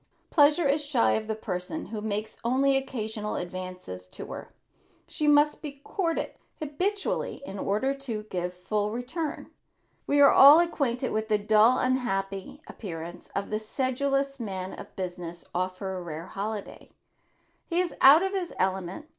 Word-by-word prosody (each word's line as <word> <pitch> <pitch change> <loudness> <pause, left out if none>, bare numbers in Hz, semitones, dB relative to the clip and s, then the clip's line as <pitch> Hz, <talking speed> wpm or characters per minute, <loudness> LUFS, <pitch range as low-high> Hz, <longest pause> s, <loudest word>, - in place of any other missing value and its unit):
Pleasure 300 +1 +5
is 290 +2 +1
shy 285 -5 +2
of 220 0 -1
the 220 - -1
person 200 - -4
who 215 -1 -5
makes 215 0 -3
only 270 +3 +3
occasional 220 -5 -3
advances 180 - -6
to - - -9
her. - - -8 0.6
She 300 - -2
must 295 0 +4
be 280 -3 -7
courted 335 -2 -1 0.3
habitually 360 +2 -2
in 195 -4 -7
order 215 +9 0
to 250 -6 -5
give 180 -4 -3
a - - -23
full 205 +3 -1
return. 255 +8 -4 0.6
We 285 - +3
are 280 - +8
all 285 +4 +9
acquainted 275 -7 0
with 220 0 -1
the 215 -1 +3
dull 215 +4 +5
unhappy 195 -3 -1
appearance 170 -3 -8
of 200 - -2
the 215 - 0
sedulous 275 +4 -1
man 190 -4 -4
of - - -10
business 175 -2 -6
off 185 +1 -1
for 190 -1 -4
a 185 - -4
rare 165 -1 -6
holiday. 205 +2 -6 0.8
He 340 0 0
is 360 -1 0
out 290 +6 +9
of 385 - 0
his 375 -3 -3
element. 190 - -1
220 Hz, 160 wpm, -27 LUFS, 190-280 Hz, 0.8 s, all